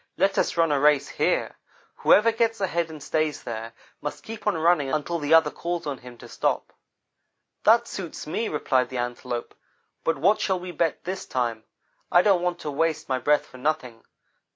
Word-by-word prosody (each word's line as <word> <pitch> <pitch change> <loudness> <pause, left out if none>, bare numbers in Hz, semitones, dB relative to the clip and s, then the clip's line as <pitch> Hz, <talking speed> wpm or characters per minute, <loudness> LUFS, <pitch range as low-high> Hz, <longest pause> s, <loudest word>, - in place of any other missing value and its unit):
Let 195 0 +2
us - - 0
run 165 -2 +3
a 145 - +2
race 150 -1 +4
here. - - 0 0.4
Whoever 230 +2 +5
gets 225 -1 0
ahead 170 -4 0
and 155 -3 -9
stays 155 0 -1
there, 115 0 -5 0.3
must 145 0 -5
keep 225 -1 -8
on 205 - +2
running 160 -4 +2
until 155 +3 -1
the 150 +2 +4
other 160 -2 +5
calls 170 +4 -4
on 140 -4 -4
him 125 -1 -12
to - - -12
stop.' - - -1 0.9
"'That 230 +2 +5
suits 180 -8 -6
me,' 220 +9 -2
replied 130 -4 +1
the 130 - -5
Antelope, 120 0 -4 0.5
'but 165 - +1
what 195 +10 +3
shall 190 -2 +1
we 180 0 -7
bet 165 -1 -1
this 185 +1 -5
time? 115 -3 -2 0.5
I 175 - +6
don't 195 -4 +4
want 180 0 -1
to 150 - -4
waste 155 +1 -1
my 130 -1 +1
breath 150 +4 +2
for 130 - -14
nothing. 130 -5 -2
155 Hz, 190 wpm, -25 LUFS, 135-180 Hz, 0.9 s, I